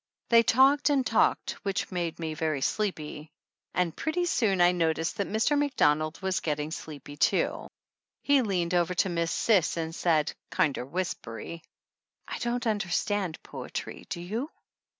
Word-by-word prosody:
They 230 -1 +7
talked 270 +6 +4
and 275 -3 +2
talked, 225 - +2
which 195 -2 -2
made 175 -3 -2
me 160 -2 -3
very 155 -2 -1
sleepy 155 -4 -2 0.5
and 180 -3 +1
pretty 345 +3 -1
soon 220 - +1
I 175 0 +6
noticed 165 0 0
that 200 - -1
Mr. 220 +8 +2
Macdonald 155 - +2
was 190 -1 +1
getting 150 0 -2
sleepy 145 -3 -8
too. - - +1 0.6
He 285 -1 +4
leaned 180 -6 -1
over 175 0 +2
to 190 - +2
Miss 170 -1 0
Cis 190 -7 +2
and 165 0 -3
said, 160 -3 +1 0.2
kinder 155 -7 0
whispery: 165 -2 -4 0.7
"I - - -5
don't 240 +1 -1
understand 205 -3 -1
poetry, - - -7
do 170 - -4
you 225 - -3
180 Hz, 150 wpm, -28 LUFS, 160-220 Hz, 0.7 s, They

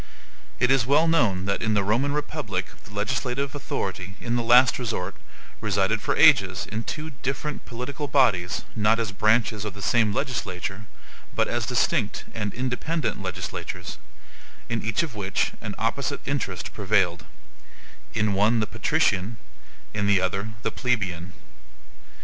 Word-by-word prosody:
It 125 +2 +4
is 130 -3 +3
well 150 +4 +4
known 115 - +2
that 100 0 -1
in 110 -1 +1
the 100 - +3
Roman 120 +8 +1
republic 145 -10 -2 0.2
the 105 - -14
legislative 125 +6 -1
authority, 95 -9 -4
in 120 0 -2
the 120 - +2
last 120 +2 +6
resort, 110 -6 -2 0.5
resided 100 +1 +1
for - - 0
ages 100 - +5
in 110 +1 -4
two 155 +1 -4
different 140 +3 -3
political 130 +5 -4
bodies 110 -11 +2
not 110 +1 +3
as 110 -3 -1
branches 110 +1 +2
of 105 -3 -5
the 100 - -8
same 115 -3 +3
legislature, 105 -5 -3 0.5
but - - +2
as - - -1
distinct - - +1
and 105 -2 -2
independent 125 0 -1
legislatures, 90 -1 -5 0.7
in 115 -1 -1
each 115 +7 0
of 155 -7 -5
which 100 -3 0
an - - -5
opposite - - -1
interest - - -3
prevailed: 95 -4 +1 0.9
in 105 -2 +2
one 105 +4 +3
the 105 - +1
patrician; 100 +2 +1 0.6
in 105 -1 0
the 100 -2 +5
other, 95 +3 -1
the - - 0
plebian. 90 -9 -1
110 Hz, 145 wpm, -25 LUFS, 100-125 Hz, 0.9 s, last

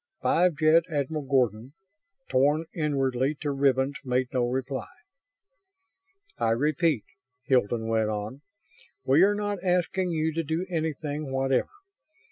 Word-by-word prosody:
Five 175 -1 +3
Jet 155 +2 +5
Admiral 150 0 -2
Gordon, 125 -2 0 0.5
torn 145 +5 +2
inwardly 135 -3 0
to 145 - -1
ribbons, 135 0 +1
made 125 -1 0
no 125 -2 +1
reply. 130 +1 -3 1.5
"I 115 - +1
repeat," 150 - +1 0.4
Hilton 120 -4 +1
went 110 -1 +1
on, 105 +6 -5 0.6
"we 135 +5 +4
are 205 +2 +5
not 205 -2 -3
asking 180 0 +1
you 160 -1 -1
to 165 +1 -1
do 160 +4 -2
anything 155 -3 -3
whatever. 135 0 +1
140 Hz, 120 wpm, -27 LUFS, 130-160 Hz, 1.5 s, Jet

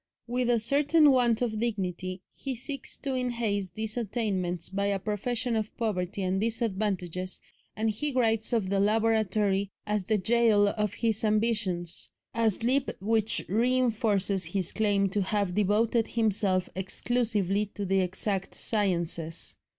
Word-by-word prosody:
With 245 0 -1
a 240 - +4
certain 290 +6 +4
want 245 -3 +3
of 220 -3 -2
dignity 185 -5 -3
he 270 -2 -4
seeks 275 +4 -3
to 275 - -3
enhance 235 -6 -1
these 220 +5 -4
attainments 195 -7 -2
by 200 +1 -1
a 200 -1 +1
profession 225 +5 -2
of 215 -1 -3
poverty 200 -4 -2
and 185 +1 0
disadvantages, 195 -5 -2 0.4
and 220 +1 -1
he 290 +8 -1
writes 225 -3 +1
of 215 -5 0
the 200 - +2
laboratory 210 -2 +2 0.2
as 210 -2 -1
the 215 +1 +2
"gaol" 215 0 +3
of 210 -1 -2
his 225 -2 0
ambitions, 210 -6 +1 0.2
a 230 -1 +3
slip 250 +6 -1
which 220 +2 0
reinforces 220 -4 +1
his 180 +1 -2
claim 205 -2 +2
to 205 +2 0
have 200 -1 0
devoted 215 +3 +2
himself 200 -5 +1
exclusively 205 0 0
to 205 - -3
the 195 +1 +2
exact 190 +1 -2
sciences. 170 -6 -1
210 Hz, 140 wpm, -28 LUFS, 195-230 Hz, 0.4 s, a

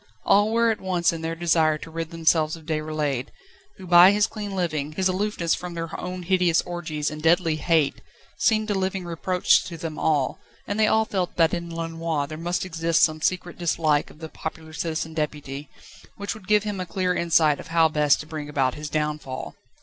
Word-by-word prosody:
All 205 +2 +4
were 230 0 +3
at 220 - -4
one 185 -2 -2
in 165 -1 -6
their 165 0 -3
desire 165 -2 +2
to 160 - -10
rid 165 0 -4
themselves 160 -1 +2
of 160 -2 -14
Déroulède, 155 -4 -2 0.5
who 190 - -10
by 175 +1 +8
his 205 +1 +3
clean 205 -3 -6
living, 155 -5 -2
his 190 +3 +1
aloofness 185 -3 0
from 175 -1 -5
their 165 -1 -5
own 180 0 -5
hideous 180 -2 +3
orgies 160 -4 -3
and 155 0 -7
deadly 165 0 +3
hates, 155 -2 +1 0.4
seemed 215 -1 +1
a - - +2
living 190 -1 -2
reproach 170 +1 +2
to 170 - -7
them 160 -2 -6
all; 145 -4 +1 0.3
and 205 +1 -3
they 215 - +5
all 220 0 +3
felt 185 -4 -2
that 165 -2 +3
in 170 -1 -3
Lenoir 165 -2 -2
there 155 +2 -7
must 175 +2 -2
exist 165 -2 +1
some 155 -1 +2
secret 180 +1 -1
dislike 155 -3 +1
of - - -16
the 160 0 -8
popular 160 0 -7
Citizen 160 0 -3
Deputy, 150 -2 -4 0.5
which 200 0 -3
would 215 -4 -13
give 210 -1 +4
him 205 -2 -4
a 180 - -4
clear 180 0 0
insight 160 -4 +3
of - - -9
how 165 0 +4
best 150 -2 +3
to - - -10
bring 155 -2 -6
about 135 -3 +1
his 150 0 -6
downfall. 150 -3 -3
165 Hz, 205 wpm, -24 LUFS, 155-180 Hz, 0.5 s, by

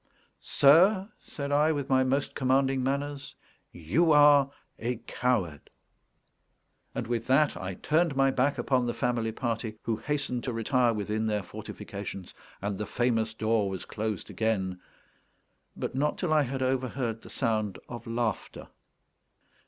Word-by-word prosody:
"Sir," 185 +8 +5
said 140 -1 -6
I, 150 +2 +4
with 145 -3 -2
my 130 -1 +3
most 135 +2 0
commanding 135 0 +2
manners, 140 +2 -3 0.4
"you 110 - +1
are 145 -2 +6 0.3
a 120 +2 -1
coward." 100 - -1 1.3
And - - -2
with 120 0 -2
that 140 +3 +3
I 95 0 -5
turned 160 - +1
my 135 0 +3
back 135 +2 +1
upon 125 -2 +1
the 120 - -2
family 120 -2 0
party, 115 -2 -3
who 115 -2 -1
hastened 135 -3 -2
to 125 - -2
retire 120 +2 +2
within 105 +1 -2
their 105 -2 -1
fortifications; 95 +1 -8 0.3
and 100 -1 -2
the 105 - -3
famous 115 -2 0
door 110 -2 +1
was 95 -1 -5
closed 110 -3 -4
again, 95 -5 -1 1.0
but - - -3
not 145 +3 0
till 170 -4 0
I 155 - +5
had 135 -1 -2
overheard 130 -3 -1
the - - -13
sound 110 -6 -1
of 120 -2 -8
laughter. 115 -2 -3
125 Hz, 145 wpm, -28 LUFS, 110-140 Hz, 1.3 s, are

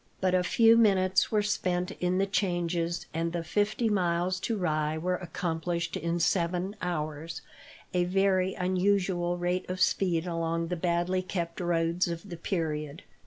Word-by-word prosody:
But 185 -1 +1
a 185 - +4
few 225 +5 +5
minutes 190 -4 +3
were 210 -2 +2
spent 180 -3 -1
in 180 +1 +1
the 195 - +3
changes, 175 -3 -1
and 165 +1 -1
the 170 -1 -2
fifty 210 +6 0
miles 180 -2 +1
to 225 +3 -2
Rye 155 -4 0
were 180 +3 -1
accomplished 170 0 -3
in 170 +2 -1
seven 180 +3 0
hours 160 -1 -3 0.5
a 180 -1 +2
very 190 0 +2
unusual 180 -1 +1
rate 180 +1 -1
of 185 0 -3
speed 180 -2 +2
along 165 -1 -2
the 180 - -1
badly 175 +2 0
kept 170 -3 -4
roads 170 0 +1
of 170 +3 -5
the 170 - -5
period. 155 -4 -3
175 Hz, 155 wpm, -29 LUFS, 170-185 Hz, 0.5 s, few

